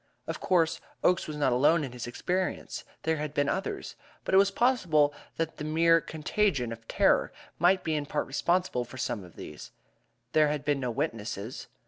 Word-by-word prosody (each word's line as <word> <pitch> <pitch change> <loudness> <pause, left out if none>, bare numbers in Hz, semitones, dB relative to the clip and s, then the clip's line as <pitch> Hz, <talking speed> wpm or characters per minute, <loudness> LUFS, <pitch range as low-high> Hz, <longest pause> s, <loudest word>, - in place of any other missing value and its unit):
Of - - -4
course, 165 -3 +2 0.2
Oakes 180 +1 +3
was 155 -1 -5
not 140 -4 +2
alone 150 +6 +4
in 135 - -5
his 120 -1 -6
experience 180 +9 -2 0.2
there 160 0 +1
had 150 -1 -4
been 145 -1 +2
others 200 - -3 0.3
but - - -2
it - - +7
was 200 0 +5
possible 185 - +3 0.2
that 160 -1 -2
the - - -5
mere 165 +2 +4
contagion 155 - 0
of 115 0 -9
terror - - +3 0.3
might 185 +3 +4
be 160 - -1
in 150 -2 -1
part - - -1
responsible 170 -1 0
for 125 +2 -11
some 110 -5 -2
of 90 - -14
these. - - -9 0.6
There 155 -1 +5
had 150 -1 -2
been 145 -2 +1
no 125 -2 -2
witnesses. 115 -1 -4
150 Hz, 185 wpm, -29 LUFS, 130-175 Hz, 0.6 s, it